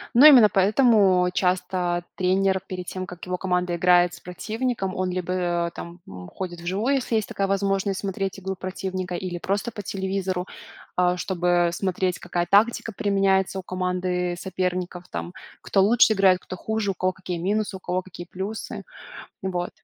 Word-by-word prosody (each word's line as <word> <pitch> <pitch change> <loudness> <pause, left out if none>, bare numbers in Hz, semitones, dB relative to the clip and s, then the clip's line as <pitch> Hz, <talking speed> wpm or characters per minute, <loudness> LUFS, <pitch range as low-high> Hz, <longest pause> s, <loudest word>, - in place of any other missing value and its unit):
Но 255 +5 +8
именно 250 -8 +9
поэтому 195 -2 +4
часто 180 -1 0
тренер 190 +1 +2
перед 180 -1 -5
тем, 185 0 -4
как 175 -1 -9
его 180 0 -2
команда 180 -1 0
играет 175 0 +4
с - - -10
противником, 215 +2 -3
он 185 0 -1
либо, 180 -1 -1
а, - - -6
там, 170 +1 -9
м, 90 0 -9
ходит 175 -2 -6
вживую, 200 +10 0
если 255 -3 -1
есть 215 -2 0
такая 195 - -1
возможность, 195 0 0
смотреть 195 0 -3
игру 190 0 -4
противника 185 0 -4
или 175 -1 -4
просто 200 +6 -2
по 210 -2 -7
телевизору. 190 -1 -2 0.5
А, 180 0 +3
чтобы 175 -1 +1
смотреть, 185 -1 -1
какая 175 0 -2
тактика 225 +3 +3
применяется 195 -1 +1
у - - -7
команды 180 -1 -1
соперников, 180 -1 -3
там 85 0 -5 0.3
кто 195 - +2
лучше 220 +2 +5
играет, 190 -3 +4
кто 185 - -8
хуже, 220 0 -1
у - - -4
кого 185 +1 0
какие 180 -2 -5
минусы, 200 +3 -1
у - - -16
кого 185 0 -2
какие 175 -1 -10
плюсы. 195 +5 -6 0.6
Вот. 180 -2 -2
185 Hz, 165 wpm, -24 LUFS, 180-195 Hz, 0.6 s, именно